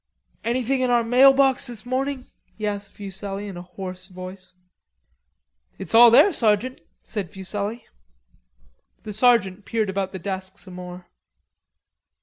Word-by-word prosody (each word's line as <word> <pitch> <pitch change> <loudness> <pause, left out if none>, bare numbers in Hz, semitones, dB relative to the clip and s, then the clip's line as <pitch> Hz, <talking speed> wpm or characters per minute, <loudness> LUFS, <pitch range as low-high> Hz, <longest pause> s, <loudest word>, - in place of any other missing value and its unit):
"Anything 255 +2 0
in 255 - +1
our 240 -1 +3
mailbox 270 +3 +5
this 240 -1 -8
morning?" 260 +1 -2 0.3
he 215 - -4
asked 205 -1 -4
Fuselli 200 0 -6
in 195 - -7
a 175 - -7
hoarse 185 0 -7
voice. 185 0 -10 1.2
"It's - - -7
all 235 +1 +9
there, 335 - +6
sergeant," 225 +2 +1 0.2
said 200 -6 -5
Fuselli. 205 +4 -4 1.2
The 210 - -6
sergeant 210 -4 +3
peered 220 -3 -1
about 190 -1 -2
the 190 - -6
desk 190 +1 -5
some 185 - -11
more. 180 0 -9
205 Hz, 135 wpm, -23 LUFS, 190-245 Hz, 1.2 s, all